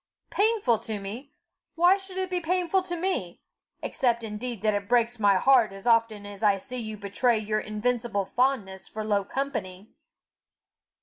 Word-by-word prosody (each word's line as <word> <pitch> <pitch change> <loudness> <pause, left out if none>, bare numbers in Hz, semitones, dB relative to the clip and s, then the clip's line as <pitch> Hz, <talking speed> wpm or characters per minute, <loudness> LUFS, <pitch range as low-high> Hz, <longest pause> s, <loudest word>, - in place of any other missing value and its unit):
"Painful 410 - +2
to 220 -2 -4
me! 225 +9 -7 0.4
Why 350 +3 +5
should 385 -1 -9
it 375 0 -2
be 360 - +1
painful 360 +2 +1
to 360 -1 -4
me 330 - -2 0.4
except 235 -2 0
indeed 220 0 -5
that 215 -1 +3
it 200 0 -3
breaks 240 -1 +2
my 200 -2 +4
heart 240 +1 +4
as 195 0 -11
often 230 -3 +2
as 205 0 -9
I 205 -2 +4
see 250 +6 -7
you 215 -2 -5
betray 210 +4 +1
your 215 0 -1
invincible 215 -1 -1
fondness 205 -6 -1
for 215 0 -6
low 205 -2 +1
company?" 200 -6 -4
230 Hz, 165 wpm, -27 LUFS, 205-275 Hz, 0.4 s, Why